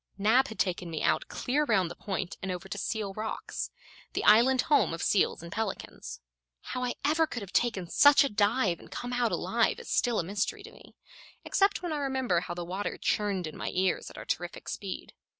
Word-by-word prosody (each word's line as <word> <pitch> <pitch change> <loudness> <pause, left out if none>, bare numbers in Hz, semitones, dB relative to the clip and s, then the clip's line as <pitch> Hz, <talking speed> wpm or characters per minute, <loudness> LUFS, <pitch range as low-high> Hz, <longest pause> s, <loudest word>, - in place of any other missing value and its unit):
Nab 225 +7 +4
had 220 - -9
taken 180 -2 -1
me 160 -2 -3
out - - +2
clear 285 +4 0
round 195 - +2
the - - -8
point 190 -2 -4
and 190 - -3
over 180 +1 -5
to 200 - -5
Seal 205 -1 -2
Rocks 215 +2 -4 0.4
the - - -1
island 245 +4 +6
home 290 - +3
of 165 - -5
seals 190 -4 +2
and 170 - -9
pelicans. 220 -1 -5 0.4
How 250 - -4
I 245 - -1
ever 320 +2 +3
could 240 -7 -5
have 195 - -11
taken 205 -7 +1
such 285 - +7
a 280 - 0
dive 205 -3 +2
and - - -14
come 245 0 -5
out 245 -2 +1
alive - - +1
is 475 - -10
still 240 -3 +2
a - - +1
mystery 205 - -2
to 450 - -11
me, - - -17 0.5
except 395 -1 +2
when 345 -3 -2
I - - -1
remember 265 -9 +1
how 175 0 -5
the 175 0 -4
water 190 +4 -3
churned 200 -4 0
in 155 - -7
my - - -3
ears 185 0 +1
at - - -13
our - - -7
terrific - - -4
speed. - - -6
215 Hz, 215 wpm, -29 LUFS, 185-260 Hz, 0.5 s, such